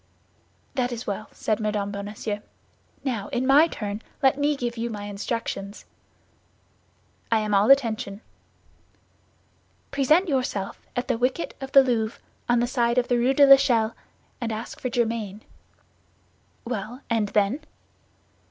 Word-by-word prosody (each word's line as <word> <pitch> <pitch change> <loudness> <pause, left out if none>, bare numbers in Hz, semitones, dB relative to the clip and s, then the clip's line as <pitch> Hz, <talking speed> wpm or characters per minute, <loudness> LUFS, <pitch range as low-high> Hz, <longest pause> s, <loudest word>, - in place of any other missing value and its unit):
"That 250 -2 0
is 240 0 -5
well," 215 +1 -4
said 215 - -1
Mme. 210 -2 -1
Bonacieux. 205 +1 -4 0.6
"Now, 230 -7 -2
in 250 - -1
my 285 +5 +6
turn, 210 -7 -5 0.2
let 265 -1 +5
me 290 +1 +1
give 240 -3 -3
you 235 0 -3
my 210 -2 -6
instructions." 205 -1 -4 1.5
"I 225 - +5
am 210 -1 -2
all 200 +4 +4
attention." 230 -6 +3 1.7
"Present 305 +7 +3
yourself 255 - -2
at 245 - -2
the 250 -3 0
wicket 255 +7 -1
of 270 0 -6
the 275 - +9
Louvre, 230 -3 -1 0.3
on 240 0 +4
the - - +2
side 240 -1 +1
of 245 - +2
the 245 - +3
Rue 255 +3 +2
de 285 - +7
l'Echelle, 260 -5 +5 0.5
and 230 -1 -2
ask 220 +1 -6
for 255 - -2
Germain." 225 -4 -1 1.2
"Well, 240 +2 -5
and 225 -3 +1
then?" 205 +6 +1
235 Hz, 140 wpm, -25 LUFS, 210-260 Hz, 1.7 s, the